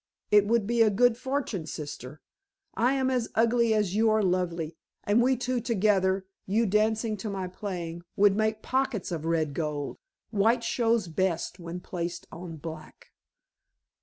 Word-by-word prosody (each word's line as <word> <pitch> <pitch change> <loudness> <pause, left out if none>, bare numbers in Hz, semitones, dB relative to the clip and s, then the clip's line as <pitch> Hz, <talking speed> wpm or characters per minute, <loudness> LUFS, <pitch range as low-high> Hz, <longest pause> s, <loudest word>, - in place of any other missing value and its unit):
It 205 -1 +6
would 230 -1 +2
be 235 +2 +1
a 220 - +6
good 235 +3 +4
fortune, 250 - -3
sister. 145 -1 -7 0.5
I 245 +4 +2
am 265 -1 +1
as 245 -3 0
ugly 235 +1 +3
as 210 -4 +1
you 220 +2 +3
are 215 0 +3
lovely, 175 -3 -1 0.3
and 210 +3 +3
we 255 +1 +3
two 250 +1 -1
together, 195 -4 +2 0.2
you 220 +4 +2
dancing 215 +2 +1
to 210 +2 -5
my 190 -2 -3
playing, 175 -3 -5
would 200 -1 +5
make 215 0 0
pockets 260 -7 -1
of 160 -2 -3
red 160 -3 0
gold. 150 -2 -3 0.3
White 225 +3 +2
shows 230 -4 +1
best 170 +2 -1
when 170 +1 -6
placed 175 -1 -5
on 170 -1 -8
black." 160 0 -9
205 Hz, 160 wpm, -28 LUFS, 175-230 Hz, 0.5 s, It